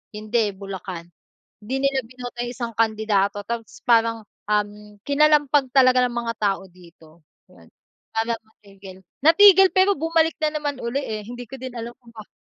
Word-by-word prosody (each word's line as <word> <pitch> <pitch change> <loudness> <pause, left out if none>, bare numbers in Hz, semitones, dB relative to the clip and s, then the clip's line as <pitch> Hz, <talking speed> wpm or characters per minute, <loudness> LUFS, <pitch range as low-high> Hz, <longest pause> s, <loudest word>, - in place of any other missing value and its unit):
hindi 215 0 0
Bulacan 190 -3 -8 0.6
hindi 265 +5 -3
nila 265 -2 -1
binoto 245 0 -10
yung 240 - -5
isang 235 -1 -5
kandidato 215 -2 +1
tapos 235 -1 -6
parang, 230 -1 +3 0.3
um, 210 0 -2
kinalampag 290 -2 +3
talaga 255 -1 +5
ng - - -8
mga 235 -1 -2
tao 195 -2 0
dito 170 -2 -19 0.9
para 225 +1 0
matigil, 195 -3 -15 0.3
natigil 385 +3 +7
pero 385 +1 +4
bumalik 325 +1 +1
na 305 0 0
naman, 290 -1 -3 0.2
eh, 215 -6 -5
hindi 245 +2 -8
ko 270 - -8
din 260 0 -6
alam 235 0 -6 0.2
bakit, 215 -2 -12
230 Hz, 145 wpm, -22 LUFS, 210-270 Hz, 0.9 s, natigil